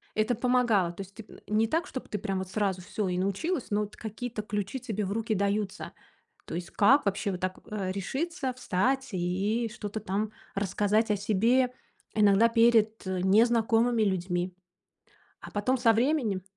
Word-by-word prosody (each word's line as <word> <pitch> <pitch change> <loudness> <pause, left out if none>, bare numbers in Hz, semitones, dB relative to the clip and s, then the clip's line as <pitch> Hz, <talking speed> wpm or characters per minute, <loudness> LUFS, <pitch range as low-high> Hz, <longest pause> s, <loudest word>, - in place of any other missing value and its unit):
Это 215 +2 +1
помогало. 240 -7 +2
То 195 - -7
есть 195 0 -11
ты, 220 - -10
м, - - -14
не 215 +1 +2
так, 330 +7 0
чтоб 260 - -6
ты 210 - -3
прям 195 -2 -2
вот 190 - -4
сразу 190 -2 -1
всё 205 +1 -3
и 180 - -1
научилась, 230 - -1
но 205 - +2
вот 210 0 -6
какие-то 225 +1 -5
ключи 205 +4 -3
тебе 215 -4 -3
в 190 - -4
руки 225 0 -1
даются. 200 0 -1 0.5
То - - -8
есть 175 +1 -5
как 265 +7 +4
вообще 200 +1 0
вот 180 - -4
так, 185 0 -2
а, 200 -3 -2
решиться, 270 - -3
встать 260 +3 0
и 195 +6 0
что-то 210 -1 -5
там 210 +1 -2 0.2
рассказать 205 +3 +1
о 210 - +3
себе 230 +6 +2 0.4
иногда 210 +1 +5
перед, 225 -3 +3
э, 185 -1 -1
незнакомыми 225 +3 +3
людьми, 180 -2 -1 0.9
а - - -10
потом 255 +6 0
со 230 -2 +5
временем 235 -6 +1
215 Hz, 175 wpm, -28 LUFS, 195-235 Hz, 0.9 s, иногда